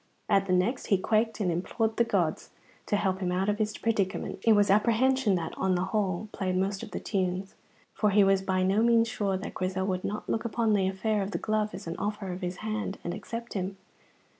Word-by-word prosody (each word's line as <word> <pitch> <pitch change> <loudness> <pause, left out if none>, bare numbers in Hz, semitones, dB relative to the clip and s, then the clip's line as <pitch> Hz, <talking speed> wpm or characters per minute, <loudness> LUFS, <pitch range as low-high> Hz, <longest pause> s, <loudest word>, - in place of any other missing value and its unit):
At 195 0 +3
the 185 - +1
next 200 +8 +1
he 200 - +4
quaked 220 +3 +1
and 185 -4 +1
implored 220 +6 -1
the 235 - +5
gods 180 -8 -1 0.4
to - - +1
help 190 -2 0
him 180 -2 -1
out 190 +3 0
of 210 +1 0
his 215 0 -1
predicament. 200 -5 -1
It 225 - +5
was 205 -2 +4
apprehension 235 +1 +3
that, 165 -2 -3
on 190 -1 +2
the 180 - 0
whole, 205 -1 0
played 185 -2 -1
most 195 +1 -1
of - - -7
the - - -4
tunes, 190 -1 -2 0.4
for 210 - +2
he 205 0 +5
was 195 0 +4
by 190 -1 0
no 195 +3 +3
means 230 0 +4
sure 200 -4 -1
that 190 - -6
Grizel 185 0 -2
would 185 -2 -1
not 210 +1 -4
look 225 - -1
upon 230 -1 +1
the 195 -2 +2
affair 205 +2 0
of 195 - -2
the - - -2
glove 215 -2 -1
as 195 - -8
an 165 0 -5
offer 205 -2 -3
of 180 - -7
his 180 0 -3
hand, 215 -2 -2
and 175 - -3
accept 230 +4 -6
him. 195 0 -3
200 Hz, 230 wpm, -28 LUFS, 185-215 Hz, 0.4 s, the